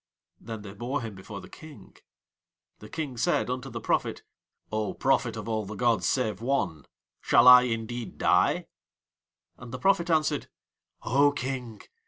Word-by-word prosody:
Then 110 -3 -8
they 100 -2 -9
bore 120 +6 -3
him 110 -2 -6
before 100 +1 -9
the - - -12
King. 155 -2 -14 0.8
The - - -12
King 145 -6 -5
said 125 0 +1
unto 130 +1 -4
the 115 -1 -6
prophet: - - -1 0.5
"O 110 -1 -2
Prophet 130 -4 +1
of 110 -1 -6
All 110 -1 -1
the 105 +1 -7
gods 120 0 +1
save 110 -5 0
One, 100 - -1 0.3
shall - - +5
I 125 0 +11
indeed 115 0 -4
die?" - - +2 0.9
And 120 -1 -10
the 130 - -4
prophet 175 +4 +2
answered: 155 -3 +1 0.5
"O 140 +3 +4
King! 125 -5 -5
120 Hz, 155 wpm, -27 LUFS, 110-135 Hz, 0.9 s, I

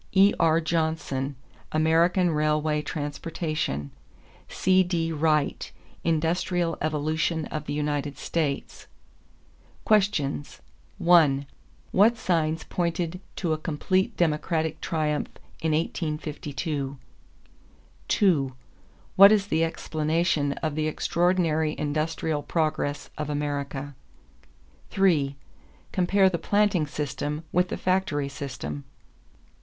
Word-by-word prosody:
E.R. 175 -5 +4
Johnson, 160 -4 -1 0.4
American 165 +3 +3
Railway 150 0 +1
Transportation. 150 - -3 0.6
C.D. 180 -3 +2
Wright, 155 -1 0 0.3
Industrial 165 +1 0
Evolution 155 +1 0
of 155 -1 -4
the 145 - -2
United 145 -2 -2
States. 145 -3 -3 1.0
=Questions= 190 - +1 0.4
1. 155 -6 +4 0.5
What 220 +5 +5
signs 160 -5 0
pointed 175 0 -2
to 170 -4 0
a 155 - -2
complete 185 +5 0
Democratic 160 -1 0
triumph 155 -2 -1 0.3
in 160 - +1
1852? 150 -3 -3 1.1
2. 150 -10 +2 0.6
What 200 +1 +9
is 210 -2 +3
the 160 +1 +2
explanation 155 -2 0
of 155 -2 0
the 155 +1 -1
extraordinary 165 -1 +1
industrial 155 0 -1
progress 155 -3 -1
of 150 -1 -3
America? 145 -1 -3 1.0
3. 155 -8 +2 0.6
Compare 190 +2 +3
the 175 -3 0
planting 200 -5 +2
system 150 +1 -3
with 180 +1 +2
the - - -3
factory 180 -7 0
system. 100 - -6
155 Hz, 95 wpm, -26 LUFS, 150-175 Hz, 1.1 s, What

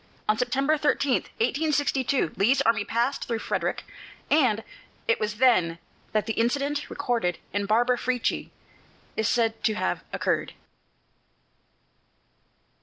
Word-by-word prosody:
On 215 - +4
September 275 +6 +1
13, 290 -2 +2
1862, 285 - 0
Lee's 260 +7 +3
army 225 -4 +2
passed 235 +6 -1
through 230 - -1
Frederick, - - -2 0.5
and 240 -8 +3 0.4
it 465 - +2
was 210 0 -2
then 210 -9 +3 0.3
that 215 -1 +1
the 225 - -2
incident 280 +6 0
recorded 235 -11 -1 0.2
in 205 0 -1
"Barbara 240 +3 +3
Frietchie" 250 -1 -1 0.7
is 220 - 0
said 225 -2 +1
to 215 - +2
have - - -1
occurred. - - -1
245 Hz, 115 wpm, -26 LUFS, 220-275 Hz, 0.7 s, On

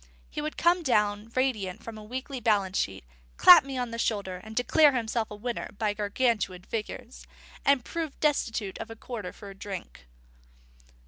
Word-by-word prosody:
And - - -24 0.2
he - - -3
would 305 +1 -4
come 350 +1 +3
down 210 -6 +1
radiant 220 -8 -1
from 230 - -7
a 215 - -9
weekly 260 +4 -5
balance 205 -5 +1
sheet, 95 0 -2 0.3
clap 180 - +10
me 270 -1 -5
on 245 -2 -2
the 230 - -5
shoulder, 195 -5 -1
declare 280 +6 +4
himself 230 -2 -1
a 210 - -7
winner 235 +3 -4
by 210 -1 0
Gargantuan 205 -3 0
figures, 65 - -6 0.4
and 280 -3 +3
prove 325 -4 -4
destitute 225 -9 0
of - - -6
a 225 - -8
quarter 220 -5 -6
for 200 -2 -11
a - - -12
drink. 190 - -8
220 Hz, 175 wpm, -28 LUFS, 200-255 Hz, 0.4 s, clap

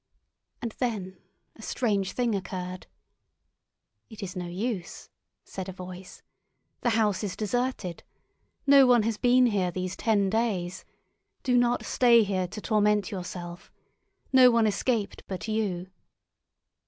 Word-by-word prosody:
And 230 - -2
then 195 -7 -3 0.4
a - - -14
strange 205 -5 -1
thing 240 -3 0
occurred. 185 -2 -5 1.2
"It 220 -3 -9
is 180 -2 -6
no 180 -1 -4
use," 185 0 -4 0.3
said 190 0 -7
a - - -6
voice. 185 0 -10 0.6
"The 240 - +1
house 210 -2 +1
is 200 -3 -3
deserted. 215 -5 -2 0.6
No 275 -2 +7
one 240 -3 +5
has 225 -1 -1
been 250 +1 +5
here 200 -6 +1
these 185 +1 -4
ten 205 -1 +2
days. 190 -4 -1 0.6
Do 250 -1 +2
not 245 0 +2
stay 235 -2 +5
here 190 -3 -1
to 195 - -8
torment 210 -1 +2
yourself. 180 -2 -7 0.6
No 255 -1 +8
one 230 -2 +3
escaped 215 +1 -1
but 190 +3 -5
you." 195 -4 -2
205 Hz, 130 wpm, -27 LUFS, 185-235 Hz, 1.2 s, No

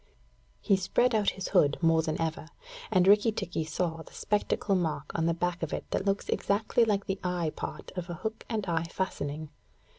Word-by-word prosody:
He 200 -3 +3
spread 240 +6 +2
out 210 -2 +3
his 190 - -4
hood 150 -7 +4
more 165 -1 +4
than 155 -1 -2
ever, 160 -1 -2 0.4
and 185 -2 +4
Rikki 210 +3 +6
tikki 170 -6 -3
saw 165 0 -2
the - - -14
spectacle 210 -1 0
mark 160 -7 -1
on 165 0 +1
the 170 - +3
back 175 +1 -1
of 160 - -3
it - - -3
that 190 - 0
looks 195 0 0
exactly 215 +3 +2
like 205 -3 +1
the 195 0 -2
eye 175 -3 0
part - - -6
of 180 -1 -4
a 175 - -3
hook 220 +6 -5
and 220 -4 -1
eye 165 -2 0
fastening. 155 -4 -3
180 Hz, 200 wpm, -29 LUFS, 165-200 Hz, 0.4 s, Rikki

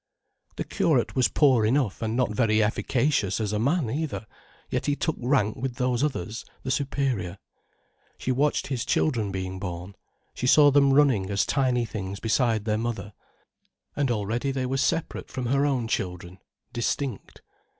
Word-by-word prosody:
The - - -2
curate - - +1
was 130 -2 +4
poor 130 -7 +4
enough, 120 -2 +1
and 110 +1 -1
not 125 -4 +1
very 110 -1 +2
efficacious 115 -1 0
as 105 -1 -1
a 105 - 0
man, 140 +4 +1
either, 130 -6 -3 0.4
yet - - -2
he 145 - +2
took 160 +1 -1
rank 120 -4 +1
with 130 -1 -3
those 125 0 0
others, 115 -7 -2 0.2
the 130 - -2
superior. 130 -10 -1 0.8
She 130 - -2
watched 145 +4 +1
his 130 -3 -2
children 115 -7 0
being 95 0 -4
born, 90 0 -6 0.4
she 125 - -2
saw 145 +2 +7
them 140 0 +5
running 135 -9 +3
as 100 -1 +1
tiny 125 -3 +1
things 100 -3 -5
beside 110 -2 +1
their 110 -1 0
mother. 115 -3 -4 0.8
And 140 -2 0
already 115 +4 -1
they 130 -1 -2
were 135 +1 -1
separate 165 +4 -1
from 130 -2 -4
her 140 +4 +2
own 130 -5 0
children, 90 -3 -4 0.3
distinct. 120 0 -3
120 Hz, 160 wpm, -26 LUFS, 105-135 Hz, 0.8 s, saw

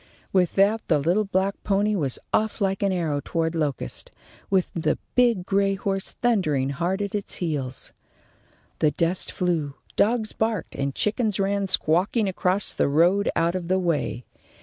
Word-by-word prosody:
With 180 -3 +2
that 205 +3 +3
the 155 - +3
little 175 +9 +1
black 195 +1 -1
pony 205 +1 +1
was 140 -9 +1 0.2
off 220 +1 +1
like 195 -2 0
an 200 -1 +2
arrow 160 -6 -1
toward 165 -1 -1
Locust, 145 - -3 0.4
with 190 -2 +1
the 160 -2 0 0.2
big 235 -7 +3
gray 195 0 +1
horse 195 0 -2
thundering 155 - +2
hard 180 +8 -1
at 200 - -5
its 205 -1 -2
heels. 145 -7 -4 0.9
The 155 - +4
dust 165 +5 -1
flew, 160 -6 -1 0.2
dogs 220 0 +2
barked, 220 -4 -2
and 140 -1 -3
chickens 215 -1 0
ran 200 0 0
squawking 185 +5 +2
across 185 +1 +1
the - - +1
road 175 +8 +3
out 170 +1 +2
of 180 -2 -4
the 185 +1 +2
way. 165 -8 -1
185 Hz, 160 wpm, -24 LUFS, 160-200 Hz, 0.9 s, The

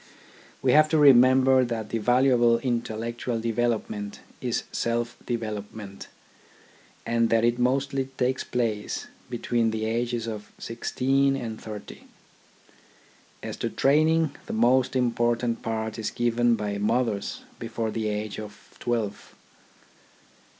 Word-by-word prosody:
We 130 - +4
have 155 +3 +6
to 160 - +2
remember 130 -1 +6
that 115 -3 -3
the 115 - -1
valuable 120 0 +4
intellectual 115 -1 -2
development 110 -3 -2 0.2
is 120 -2 -1
self 120 0 -1
development, 105 -3 -5 1.0
and 115 0 +2
that 115 0 +3
it 120 +1 +1
mostly 135 +2 +1
takes 130 +1 0
place 115 -4 -2 0.2
between 120 -1 0
the 110 0 -2
ages 120 +1 -1
of 105 -2 -6
sixteen 135 +4 0
and 115 -4 -5
thirty. 105 -2 -9 1.4
As - - -5
to - - -2
training, 155 +2 +3
the - - -4
most 125 +4 +3
important 120 -1 +1
part 110 0 -3
is 110 - -2
given 120 0 +2
by 105 -2 -3
mothers 110 -1 -1 0.2
before 110 -1 -3
the 110 -1 -2
age 105 0 -3
of 105 -1 -11
twelve. 115 -4 -3
120 Hz, 120 wpm, -26 LUFS, 110-125 Hz, 1.4 s, have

